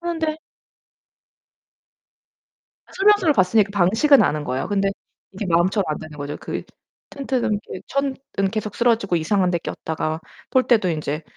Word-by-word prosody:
그런데 325 -2 -2 2.6
설명서를 390 -5 +4
봤으니까 200 +1 +3
방식은 220 - +4
아는 150 0 0
거예요. 130 -2 -2
근데 200 -1 +1 0.4
이게 195 +2 -5
마음처럼 180 +4 +2
안 155 - -2
되는 155 -1 -10
거죠. 145 +1 -5
그 - - -5 0.5
텐트는 265 -5 -1 0.2
이렇게 185 - -7
천은 275 -1 -1 0.4
계속 215 -2 -3
쓰러지고 225 -6 +2
이상한데 180 +1 +1
꼈다가 160 -1 -4 0.3
폴대도 240 -6 +3
인제 155 -1 -3
200 Hz, 310 characters per minute, -22 LUFS, 165-260 Hz, 2.6 s, 설명서를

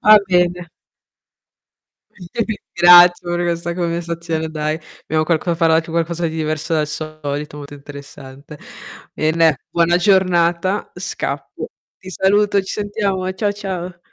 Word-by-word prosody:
Ah 215 0 +8
bene. 180 -2 +1 1.4
Ma - - -40
io 220 +6 -2
ti 220 -2 -4 0.2
ringrazio 175 0 +7
per 175 0 -1
questa 170 0 -2
conversazione, 170 -2 -3
dai. 155 0 -2 0.3
Abbiamo 155 0 0
qualc 160 +1 0
imparato 165 -1 +2
qualcosa 170 +1 -1
di 160 - -5
diverso 155 +1 -2
dal 155 -2 +1
solito, 150 -1 -5
molto 145 0 -9
interessante. 140 0 -12 0.6
Bene, 160 -2 +2
buona 170 +1 +2
giornata, 185 -1 +2
scappo. - - -5 0.3
Ti 185 - -10
saluto, 200 +2 +2
ci 190 - -6
sentiamo 205 -3 -2
eh. 185 - -2
Ciao, 205 -1 0
ciao. 185 -3 -6
170 Hz, 130 wpm, -19 LUFS, 155-185 Hz, 1.4 s, Ah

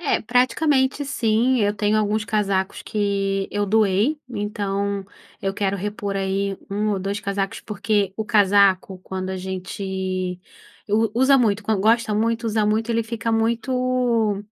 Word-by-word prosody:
É, 300 - +1
praticamente, 265 +4 +2
sim, 245 -1 +1
eu 205 0 +1
tenho 210 +1 +1
alguns 210 0 0
casacos 200 -3 -1
que 195 -2 -1
eu 205 0 -1
doei, 215 +6 +2
então 200 -3 -2 0.4
eu 195 - 0
quero 200 0 -1
repor 205 0 -4
aí 195 0 -1
1 210 +2 0
ou 195 - -2
2 200 +2 -2
casacos, 200 -1 -3
porque 210 -2 -1
o 220 - -2
casaco, 200 -3 +3
quando 185 0 -5
a 190 - -3
gente 185 0 -4 0.5
u 220 +1 +2
usa 270 +1 +6
muito, 220 -4 +1
quan 215 -2 0
gosta 220 +1 +2
muito, 230 +2 0
usa 215 -1 +1
muito, 220 +2 0
ele 230 0 +1
fica 230 0 -3
muito, 235 -1 +1
210 Hz, 150 wpm, -22 LUFS, 195-225 Hz, 0.5 s, usa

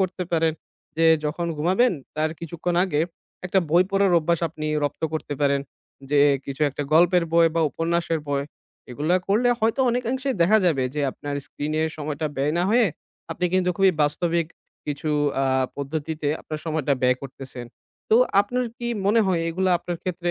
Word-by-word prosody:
করতে 185 -1 -1
পারেন 165 -1 +2 0.4
যে 165 0 +4 0.2
যখন 155 +3 -2
ঘুমাবেন 190 +11 +2 0.2
তার 155 +1 +1
কিছুক্ষণ 170 +1 -3
আগে, 155 -6 0 0.5
একটা 185 +2 +2
বই 175 +3 +6
পড়ার 195 -1 +3
অভ্যাস 170 +1 0
আপনি 155 0 -6 0.2
রপ্ত 145 - -4
করতে 155 -2 -3
পারেন। 140 -1 +2 0.5
যে 145 -1 +4 0.2
কিছু 135 0 -7
একটা 140 - -4
গল্পের 175 +2 +5
বই 170 0 +6
বা - - +3
উপন্যাসের 165 0 -1
বই। 140 -1 0 0.5
এগুলা 150 +8 +1
করলে 225 +5 +3
হয়তো 225 +4 +1
অনেকাংশে 250 +3 -2
দেখা 210 +6 +5
যাবে 140 -7 +2
যে 150 - -1
আপনার 145 +2 -6
স্ক্রিনের 155 +3 -2
সময়টা 150 0 -3
ব্যয় 140 +3 0
না 175 - +2
হয়ে, 235 0 +4 0.5
আপনি 180 - -3
কিন্তু 185 -1 +2
খুবই 195 -1 +4
বাস্তবিক 165 +3 0 0.4
কিছু 150 +1 -3 0.3
আ - - +2 0.3
পদ্ধতিতে 150 +1 -3
আপনার 155 -1 -6
সময়টা 155 -3 0
ব্যয় 125 0 +4
করতেছেন। 130 -2 -7 0.5
তো 220 - +6 0.2
আপনার 250 +5 -1
কি 240 - -3 0.2
মনে 225 +3 +4
হয় 180 -3 +1
এগুলা 185 +3 0
আপনার 175 0 -5
ক্ষেত্রে 175 -1 -2
165 Hz, 165 wpm, -24 LUFS, 150-185 Hz, 0.5 s, বই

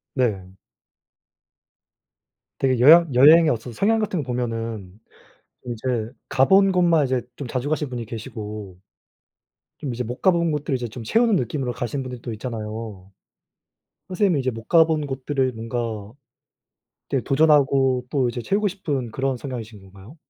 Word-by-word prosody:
네. 100 -8 -1 2.1
되게 130 -2 +1
여향 160 +3 +7
여행의 155 +6 +7
어떤 120 -2 -3
성향 220 - +2
같은 190 -7 -1
거 - - -14
보면은 115 -5 -4 0.6
좀 120 - -5
이제 115 -1 -3 0.2
가본 190 +8 +4
곳만 170 -4 +3
이제 130 -1 -1
좀 135 -4 -6
자주 130 +3 -3
가신 150 -1 -1
분이 120 -2 -5
계시고 105 -4 -8 1.0
좀 140 -5 -5
이제 125 +1 -3
못 120 +2 -7
가본 170 -3 +3
곳들을 150 -2 -2
이제 120 -2 -3
좀 115 +2 -9
채우는 225 - +2
느낌으로 125 -3 -2
가신 125 +3 -3
분들도 125 -2 -7
있잖아요. 110 -4 -7 1.0
선생님은 185 -4 +1
이제 130 -1 -1
못 115 0 -9
가본 160 -2 +3
곳들을 135 -1 -2
뭔가 115 -2 -5 1.0
이렇게 135 -3 -1
도전하고 135 -3 +3
또 130 -4 +1
이제 120 0 -4
채우고 205 - +1
싶은 145 - -4
그런 135 -1 -1
성향이신 115 -5 -7
건가요? 95 - -15
130 Hz, 305 characters per minute, -23 LUFS, 115-150 Hz, 2.1 s, 여향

